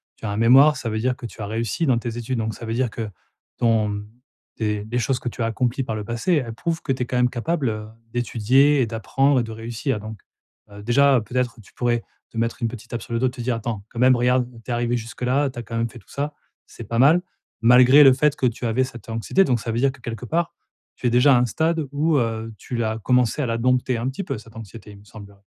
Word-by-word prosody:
tu - - -10
as 105 - -2
un 100 - -3
mémoire, 135 +6 +6
ça 125 -3 -4
veut 110 0 -2
dire 125 +2 0
que 120 - -10
tu 110 - -9
as - - -3
réussi 115 - -2
dans 125 -4 +3
tes 120 0 -4
études. 120 +1 -3
Donc 110 0 -2
ça 115 - -9
veut 115 - -3
dire 125 0 0
que 110 -1 -5 0.5
ton 105 -3 +1 0.5
des 105 -2 -2
des 120 +3 -2
choses 130 +2 0
que 125 - -3
tu 120 - -8
as - - +2
accomplies 125 +4 -1
par 110 - -4
le 105 - -4
passé, 120 - -1
elles 120 -6 -1
prouvent 165 +8 -3
que - - -2
tu 130 -1 -1
es - - -3
quand 125 - -2
même 125 0 +3
capable, 135 +3 -1
heu, 110 0 -5 0.2
d'étudier 130 +4 +3
et - - +3
d'apprendre 135 +5 +1
et 120 - 0
de 115 - -7
réussir. 115 +2 -3
Donc, 110 0 -8 0.5
heu 100 - -14
heu, 105 - -10
déjà, 135 +3 +4
peut-être 120 +2 -2
tu - - -20
pourrais 120 -1 0 0.3
te 115 - -11
mettre 115 +1 -1
une 115 - +1
petite 120 0 -9
tape 120 - -3
sur 120 - -8
le 115 - +1
dos 130 - +2
et 125 - -2
te 125 -2 -8
dire: 120 0 0
«Attends, 110 -3 -4
quand 115 - -8
même, 130 0 +6
regarde, 125 0 +2
tu 125 - -6
es - - +1
arrivée 120 0 0
jusque-là, 125 +5 -1
tu 120 - -8
as - - -5
quand 115 +1 -5
même 115 0 0
fait 120 - -12
tout - - -24
ça, 145 +1 -3 0.3
c'est - - -11
pas 115 - -2
mal», 155 +7 +6 0.4
malgré 125 +4 +7
le 135 -2 +8
fait 145 +2 +2
que 130 - -1
tu 120 0 -1
avais 115 +3 +1
cette 120 -4 -8
anxiété. 115 - +2
Donc 125 -7 +1
ça 115 - -4
veut 115 - -2
dire 135 +1 +3
que, 130 - -18
quelque 115 -1 -6
part, 170 +6 -1 0.4
tu - - -9
es - - +4
déjà 125 +3 +5
à - - +5
un 125 - +3
stade 160 +5 0
où, 155 +2 +1
heu, 115 -2 -2
tu 125 - -7
l'as 110 -1 -1
commencée 125 +3 +2
à - - 0
la 115 - -1
dompter 125 0 +1
un 115 - -2
petit 135 +9 -5
peu, 135 -8 -4
cette 110 +1 -14
anxiété, 110 -1 -10
il 100 - -13
me - - -18
semble. 100 -2 -12
120 Hz, 280 wpm, -22 LUFS, 115-130 Hz, 0.5 s, le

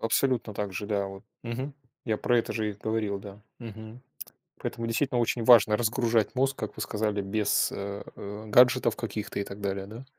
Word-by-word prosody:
Абсолютно 115 -1 +1
так 100 -1 -3
же, 100 +3 -4
да, 100 -2 0
вот. 95 0 -9 0.2
Мгм. 130 +4 -4 0.3
Я 110 -3 0
про 120 +2 +2
это 115 - -1
же 110 -2 -1
и - - -5
говорил, 105 -1 -2
да. 100 0 -11 0.2
Мгм. 110 0 -9 0.6
Поэтому 115 0 -4
действительно 125 +1 +1
очень 115 0 0
важно 110 -3 +7
разгружать 115 0 +1
мозг, 135 +1 +1
как - - -5
вы - - -3
сказали, 105 -1 -1
без 105 +1 +1
э, 100 0 -5
э, 105 +2 -7
гаджетов 125 +1 +5
каких-то 110 -3 -4
и 100 - -1
так 100 +1 -9
далее, 100 -1 -2
да? 115 +5 -9
110 Hz, 190 wpm, -28 LUFS, 100-120 Hz, 0.6 s, важно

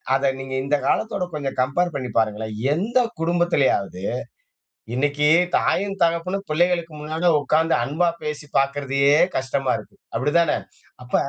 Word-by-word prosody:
அத 135 0 +2
நீங்க 135 0 -7
இந்தக் 145 +1 0
காலத்தோட 210 -4 0
கொஞ்ச 145 -2 -3
கம்பேர் 165 +7 0
பண்ணி 130 -3 -3
பாருங்களேன். 110 0 -2 0.2
எந்தக் 235 +6 0
குடும்பத்திலயாவது 165 - +1 0.9
இன்னைக்கு 145 +3 +1 0.3
தாயும் 195 0 0
தகப்பனும் 175 +4 0
பிள்ளைகளுக்கு 170 0 +1
முன்னால 160 +3 0
உட்காந்து 160 +3 +2
அன்பா 160 +7 +1 0.2
பேசிப் 150 -1 -5
பாக்குறதையே 140 0 +2 0.2
கஷ்டமா 135 0 -1
இருக்கு, - - -13 0.2
அப்டிதான? 150 +4 +2 0.5
அப்ப 125 - -11
150 Hz, 120 wpm, -22 LUFS, 135-175 Hz, 0.9 s, அத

